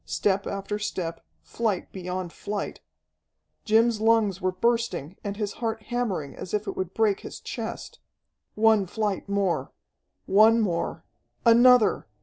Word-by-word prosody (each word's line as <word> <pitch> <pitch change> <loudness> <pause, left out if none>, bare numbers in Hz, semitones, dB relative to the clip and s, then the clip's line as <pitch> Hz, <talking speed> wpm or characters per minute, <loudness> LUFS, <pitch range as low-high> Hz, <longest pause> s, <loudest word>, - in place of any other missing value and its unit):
Step 195 -1 0
after 200 +1 -3
step, 170 -5 -4 0.2
flight 220 -6 -2
beyond 180 -1 -5
flight! 205 0 -5 0.9
Jim's 225 0 +3
lungs 220 -4 +3
were 185 - +1
bursting, 190 - -1
and 200 -1 -4
his 210 -2 -2
heart 225 -1 -1
hammering 210 - -2
as 185 - -4
if 210 0 -2
it - - -4
would 185 -2 -3
break 215 -3 +2
his - - -9
chest. - - -6 0.6
One 220 -2 +4
flight 205 0 -2
more! 190 -9 0 0.5
One 220 +4 +5
more! 175 -6 -2 0.4
Another! 240 -1 +5
205 Hz, 135 wpm, -26 LUFS, 185-225 Hz, 0.9 s, One